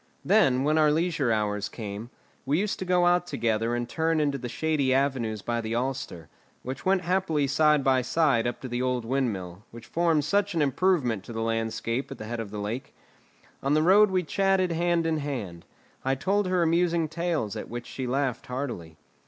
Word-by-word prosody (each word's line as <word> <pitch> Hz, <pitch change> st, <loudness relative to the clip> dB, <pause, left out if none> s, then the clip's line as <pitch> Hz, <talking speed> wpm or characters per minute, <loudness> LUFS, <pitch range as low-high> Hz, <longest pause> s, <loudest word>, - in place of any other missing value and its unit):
Then, 130 Hz, 0 st, +4 dB
when 155 Hz, +2 st, +2 dB
our 150 Hz, -1 st, +5 dB
leisure 160 Hz, -5 st, +1 dB
hours 105 Hz, -2 st, -1 dB
came, 105 Hz, +1 st, -7 dB, 0.3 s
we 140 Hz, +3 st, +1 dB
used 205 Hz, +2 st, -1 dB
to 185 Hz, -, -3 dB
go 180 Hz, -1 st, +3 dB
out 175 Hz, 0 st, +3 dB
together 115 Hz, -4 st, 0 dB
and 120 Hz, 0 st, -2 dB
turn 160 Hz, +3 st, 0 dB
into 145 Hz, -2 st, 0 dB
the 120 Hz, -, -5 dB
shady 145 Hz, -2 st, +1 dB
avenues 125 Hz, -6 st, 0 dB
by 120 Hz, 0 st, -1 dB
the 110 Hz, +1 st, -3 dB
Alster, 125 Hz, -9 st, -3 dB, 0.4 s
and 130 Hz, +1 st, -5 dB
went 190 Hz, 0 st, +2 dB
happily 175 Hz, -5 st, +1 dB
side 150 Hz, +1 st, +3 dB
by 130 Hz, -1 st, +3 dB
side 130 Hz, -4 st, +2 dB
up 120 Hz, -, -3 dB
to 130 Hz, -, -5 dB
the 120 Hz, 0 st, -2 dB
old 125 Hz, -2 st, -1 dB
windmill, 105 Hz, -8 st, -2 dB
which 115 Hz, 0 st, -12 dB
forms 165 Hz, 0 st, +1 dB
such 200 Hz, +3 st, +1 dB
an 165 Hz, -, +2 dB
improvement 140 Hz, -, +1 dB
to 120 Hz, -, -8 dB
the 115 Hz, 0 st, -2 dB
landscape 115 Hz, +2 st, -2 dB
at -, -, -7 dB
the 110 Hz, -, -7 dB
head 120 Hz, +2 st, -4 dB
of 110 Hz, -3 st, -5 dB
the 105 Hz, -, -7 dB
lake. 110 Hz, +6 st, -5 dB, 0.7 s
On 140 Hz, +2 st, +1 dB
the 155 Hz, -, +3 dB
road 200 Hz, +4 st, +6 dB
we 185 Hz, -1 st, +1 dB
chatted 190 Hz, +1 st, +1 dB
hand 170 Hz, 0 st, +1 dB
in 160 Hz, -1 st, +1 dB
hand; 115 Hz, -, -5 dB, 0.4 s
I 135 Hz, +1 st, +1 dB
told 195 Hz, +7 st, 0 dB
her 185 Hz, -1 st, +2 dB
amusing 170 Hz, 0 st, +2 dB
tales 165 Hz, -, -2 dB
at -, -, -6 dB
which 120 Hz, 0 st, -6 dB
she 130 Hz, 0 st, -5 dB
laughed 130 Hz, -1 st, -1 dB
heartily. 120 Hz, -, -5 dB
135 Hz, 200 wpm, -27 LUFS, 115-165 Hz, 0.7 s, road